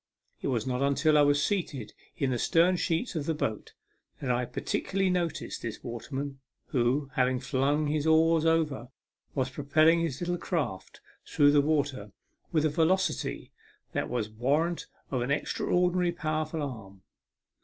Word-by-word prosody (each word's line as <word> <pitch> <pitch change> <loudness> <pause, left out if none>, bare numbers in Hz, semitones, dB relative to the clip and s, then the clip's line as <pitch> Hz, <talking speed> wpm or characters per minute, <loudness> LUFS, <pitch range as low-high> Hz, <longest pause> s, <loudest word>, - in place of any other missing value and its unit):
It - - -2
was 120 -4 0
not 125 0 -1
until 140 +2 +3
I 150 - +6
was 145 0 +3
seated 145 - -2 0.2
in 135 -2 0
the 120 - -1
stern 170 +7 +3
sheets 175 +6 -1
of 150 -3 -2
the 160 - 0
boat 110 -7 -3 0.4
that 130 - -1
I 125 0 +1
particularly 190 +9 -1
noticed 175 -2 -2
this 115 -2 -6
waterman, 135 +3 -5 0.3
who, 130 +3 +1
having 125 0 +2
flung 145 +4 +1
his 150 +1 0
oars 160 0 +4
over, 160 -6 +1 0.5
was 130 -1 0
propelling 155 +4 +3
his 165 -6 -2
little 175 0 -2
craft 150 - -3 0.3
through 145 -1 +4
the 145 0 +5
water 140 -8 -1 0.4
with 155 -1 +2
a - - +3
velocity 170 +5 0 0.4
that - - -2
was 120 -3 -1
warrant 145 +10 0 0.2
of 130 -3 0
an 125 - -2
extra 140 - -1
ordinarily 180 0 +2
powerful 155 -1 -2
arm. 100 -8 -8
145 Hz, 155 wpm, -29 LUFS, 130-165 Hz, 0.5 s, I